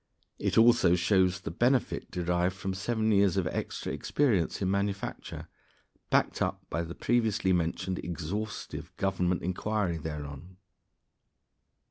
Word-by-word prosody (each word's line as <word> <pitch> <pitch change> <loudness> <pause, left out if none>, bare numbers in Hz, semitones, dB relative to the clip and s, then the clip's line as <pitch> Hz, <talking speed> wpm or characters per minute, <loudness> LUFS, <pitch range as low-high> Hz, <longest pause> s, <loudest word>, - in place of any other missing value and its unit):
It - - 0
also 115 -6 +6
shows 90 0 +2
the - - -5
benefit 125 +8 +1
derived 90 +1 0
from 95 0 -3
seven 110 +3 0
years' 100 -2 +4
extra 85 -5 -2
experience 110 - +1
in 95 -1 0
manufacture, 100 0 -3 0.6
backed - - +2
up - - -1
by 85 - 0
the 85 +1 -6
previously 110 -5 +1
mentioned 90 +2 -1
exhaustive 95 +6 -5
Government 90 -2 0
inquiry 95 0 -1
thereon. 75 +3 -7
95 Hz, 115 wpm, -29 LUFS, 85-105 Hz, 0.6 s, also